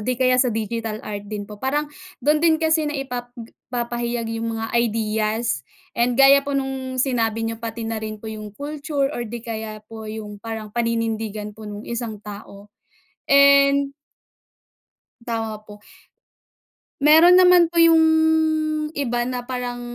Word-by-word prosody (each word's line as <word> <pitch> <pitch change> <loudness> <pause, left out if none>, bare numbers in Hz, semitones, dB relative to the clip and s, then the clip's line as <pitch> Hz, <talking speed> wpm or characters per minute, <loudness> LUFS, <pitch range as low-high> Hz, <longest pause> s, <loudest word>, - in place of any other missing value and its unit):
'di 250 +4 -1
kaya 255 0 +3
sa 255 - +3
digital 225 0 -3
art 205 -1 -6
din 210 -1 -5
po, 210 0 -12
parang 290 +3 0 0.4
do'n 300 +1 +3
din 325 -1 +4
kasi 315 -1 +1
naipap 260 -4 -4
g 230 -1 -10 0.2
naipahayag 240 -1 -3
'yong 230 0 -3
mga 225 0 -3
ideas. 220 0 -1 0.3
And 240 +1 +1
gaya 275 +1 +7
po 280 0 -3
no'ng 265 -1 -3
sinabi 230 -4 0
n'yo 225 0 -4
pati 230 0 -5
na 225 -1 -3
rin 215 0 -5
po 220 +1 -8
'yong 210 -1 -9
culture 285 -1 -2
or 240 -2 -4
'di 235 +1 -7
kaya 220 -2 -6
po 220 0 -9
'yong 210 -1 -7
parang 220 -1 -6
paninindigan 225 -2 -2
po 215 0 -10
no'ng 205 +1 -8
isang 235 -2 -4
tao. 200 -1 -10 0.6
And 280 0 +5 1.3
Tama 225 -2 -3
po. 210 -1 -13 1.2
Mayro'n 320 +5 +7
naman 360 -2 +6
po 340 - -11
'yong 330 -1 +6 0.9
iba 245 -4 -1
na 250 -1 -4
parang 245 -1 -4
235 Hz, 150 wpm, -22 LUFS, 220-275 Hz, 1.3 s, gaya